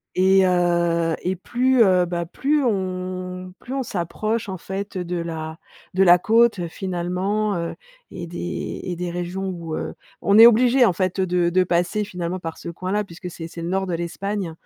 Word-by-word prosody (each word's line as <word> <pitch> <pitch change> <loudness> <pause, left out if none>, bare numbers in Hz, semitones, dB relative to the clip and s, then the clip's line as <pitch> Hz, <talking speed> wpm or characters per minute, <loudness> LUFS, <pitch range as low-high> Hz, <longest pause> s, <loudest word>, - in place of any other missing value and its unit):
et 190 +1 +5
heu, 170 -2 +2
et 185 +1 -1
plus, 250 +6 +2
heu, 185 -4 +4
bah, 170 -1 -3
plus 285 - 0
on 185 -3 -3
plus 255 - -9
on 270 - -1
s'approche, 215 +3 -2
en 185 - -5
fait, 195 +2 -5
de 180 0 -3
la 160 -1 -5 0.4
de 190 - +3
la 180 -1 +7
côte, 225 +2 +3
heu, 170 -1 -3
finalement, 190 +3 -2
heu, 170 0 -3 0.4
et 175 -2 -7
des 175 +1 -5
et 180 - -3
des 175 0 -3
régions, 180 +2 -3
où, 170 -3 -5
heu, - - -4 0.3
on 200 +1 +4
est 225 - +11
obligé 245 +2 +5
en 205 - +4
fait 185 +1 -1
de 175 -1 +1
de 185 +1 +3
passer 180 +4 0
finalement 180 -2 -4
par 165 -2 -6
ce - - -8
coin-là, 185 +5 -2
puisque 180 0 -9
c'est 165 0 -7
c'est 170 0 -8
le 170 - -3
nord 190 +1 0
de 180 - -2
l'Espagne. 175 +3 -3
185 Hz, 190 wpm, -22 LUFS, 170-200 Hz, 0.4 s, est